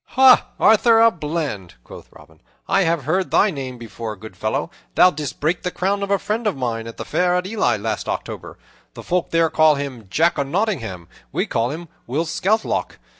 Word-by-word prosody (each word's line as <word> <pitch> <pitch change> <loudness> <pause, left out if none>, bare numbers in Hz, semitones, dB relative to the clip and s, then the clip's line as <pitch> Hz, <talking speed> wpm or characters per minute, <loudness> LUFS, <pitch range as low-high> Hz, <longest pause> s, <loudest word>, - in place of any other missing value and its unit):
"Ha, 265 -1 +7
Arthur 225 +1 +5
a 230 0 +6
Bland!" 150 - -4
quoth - - -12
Robin, 80 +1 -18 0.3
"I 195 - +3
have 165 -4 +1
heard 180 +7 0
thy 210 - +3
name 130 -5 -6
before, 115 -1 -7
good 105 -1 -12
fellow. 110 - -2 0.2
Thou 180 - +6
didst 150 -2 -6
break 160 +5 0
the 180 - -2
crown 195 +3 -1
of 200 - -3
a 200 - +3
friend 215 +4 -2
of 200 - -1
mine 115 -3 -3
at 115 - -9
the - - -6
fair 180 0 +1
at 180 0 0
Ely 190 - 0
last 110 +1 -3
October. - - -5 0.4
The - - -9
folk 180 -1 -1
there 165 -1 +2
call 155 -1 +5
him 135 -7 -6
Jock 160 - +2
o' - - +3
Nottingham; 135 - -2 0.2
we - - -1
call 115 +1 -1
him 165 +4 -6 0.2
Will 145 +7 -1
Scathelock. 210 +7 -1
155 Hz, 200 wpm, -21 LUFS, 115-190 Hz, 0.4 s, Ha